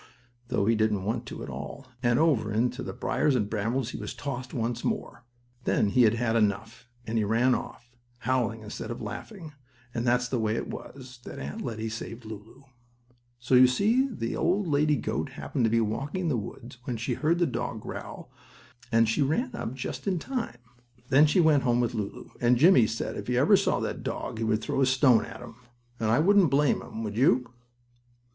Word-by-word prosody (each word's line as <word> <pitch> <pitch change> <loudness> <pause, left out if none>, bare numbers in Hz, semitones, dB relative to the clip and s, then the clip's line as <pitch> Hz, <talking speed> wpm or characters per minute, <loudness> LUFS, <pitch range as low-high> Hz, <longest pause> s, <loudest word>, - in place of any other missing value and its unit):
though 100 - 0
he 115 - +4
didn't 110 -3 +1
want 115 +4 -2
to - - -7
at - - -7
all, 70 - -7 0.2
and 120 -2 +3
over 140 -9 +2
into 120 +4 0
the - - -4
briars 150 -3 0
and 105 -4 -1
brambles 115 +4 -1
he - - -6
was - - -6
tossed 130 -2 -5
once 115 0 -2
more. 120 - -3 0.4
Then 105 - +2
he 125 - +3
had 115 -1 +5
had 115 -1 0
enough, 110 +3 -1 0.2
and 115 0 -1
he - - +2
ran 115 +5 +3
off, 120 -1 -5 0.3
howling 120 -3 0
instead 105 0 -6
of 120 - -5
laughing, 155 - -7 0.4
and 115 - -2
that's 125 0 +2
the 125 -1 -1
way 110 0 0
it - - -3
was 130 -2 -9
that - - -8
Aunt 70 +2 -6
Lettie 110 -2 -4
saved 115 +1 -7
Lulu. 110 +2 -10 0.8
You 130 0 +6
see 220 - +2
the 155 - -4
old 190 +4 +1
lady 150 -1 +2
goat 125 - -3
happened 125 - -2
to - - +3
be 115 +1 +3
walking 135 - -2
in 170 - 0
the 140 - +1
woods, 120 +2 -7
when 120 - -3
she 120 +3 -2
heard 155 +7 +1
the 175 - +3
dog 120 -5 -3
growl - - -8 0.6
and 115 -1 +4
she 115 +7 +1
ran 160 - 0
up 115 - -4
just 130 - -5
in 190 -2 +1
time. 240 - -4 0.5
Then 145 +3 +6
she 150 - +2
went 155 -4 +5
home 120 -2 +2
with 120 0 0
Lulu, 105 -3 -5
and 120 0 +4
Jimmie 135 - +6
said 115 - -3
if - - -6
he 125 0 0
ever 150 +11 +6
saw 195 - +1
that - - -3
dog 110 - -4
he - - -1
would 110 -1 +1
throw 135 - -1
a - - +5
stone 130 -3 +4
at - - -10
him, 115 - -11 0.4
and 110 - 0
I 115 - +4
wouldn't 190 +2 +5
blame 140 0 +2
him, 110 - -7
would 105 -2 -4
you? 125 0 +2
120 Hz, 205 wpm, -27 LUFS, 115-140 Hz, 0.8 s, You